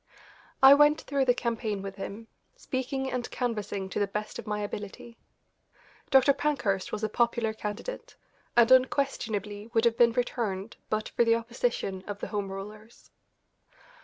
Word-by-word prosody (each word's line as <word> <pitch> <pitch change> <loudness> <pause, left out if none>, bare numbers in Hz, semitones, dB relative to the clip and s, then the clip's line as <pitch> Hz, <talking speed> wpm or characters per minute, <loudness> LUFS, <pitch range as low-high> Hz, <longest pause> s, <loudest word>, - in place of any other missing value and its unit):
I 270 +1 +11
went 295 +1 +5
through 275 -2 0
the 245 -1 +4
campaign 220 -5 -2
with 195 0 -7
him, 205 +3 -7 0.3
speaking 265 - -3
and 250 -1 -3
canvassing 210 -5 -3
to - - -3
the 205 - +1
best 210 +2 -5
of - - -8
my 210 0 -2
ability. 205 +3 -7 0.9
Dr. 270 +1 +6
Pankhurst 225 -11 -1
was 215 - -4
a - - +2
popular 235 0 +1
candidate, 230 - -6 0.4
and 235 +1 +6
unquestionably 225 -6 +1
would 225 +1 +4
have 230 -1 +3
been 235 -1 +6
returned 225 -4 -2
but 215 0 -1
for - - +2
the 230 0 +4
opposition 230 -5 -2
of 205 -1 -4
the - - -5
Home 200 -2 -3
Rulers. 210 +4 -10
225 Hz, 155 wpm, -28 LUFS, 205-250 Hz, 0.9 s, I